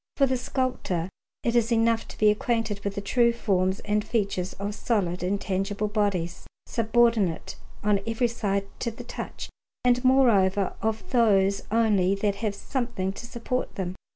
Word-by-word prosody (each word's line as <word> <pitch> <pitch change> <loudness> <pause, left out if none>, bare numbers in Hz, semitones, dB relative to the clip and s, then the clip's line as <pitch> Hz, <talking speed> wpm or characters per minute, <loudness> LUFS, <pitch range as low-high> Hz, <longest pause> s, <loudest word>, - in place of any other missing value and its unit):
For 275 - +4
the 260 -1 0
sculptor 250 -9 -2 0.3
it 235 0 0
is 235 0 +2
enough 230 0 +2
to - - -11
be 215 -1 +5
acquainted 220 -1 -1
with 200 -1 -3
the 200 - -2
true 235 +4 +3
forms 190 -4 0
and 210 0 0
features 195 -5 -1
of 200 +1 -4
solid 195 -6 -1
and 190 +3 0
tangible 200 +2 -1
bodies, 200 -5 -1 0.2
subordinate 230 -6 +1 0.3
on 205 -1 +3
every 225 +2 +1
side 200 -4 -1
to 235 - -1
the 230 +2 -9
touch, 240 - -7 0.3
and 250 0 +3
moreover 205 -8 +4
of 220 +1 -2
those 200 -5 +3
only 205 -4 +3
that 200 0 -1
have 210 -2 -2
something 235 -7 -2
to 235 - -8
support 250 +1 -3
them. 180 -2 -3
210 Hz, 160 wpm, -26 LUFS, 195-235 Hz, 0.3 s, be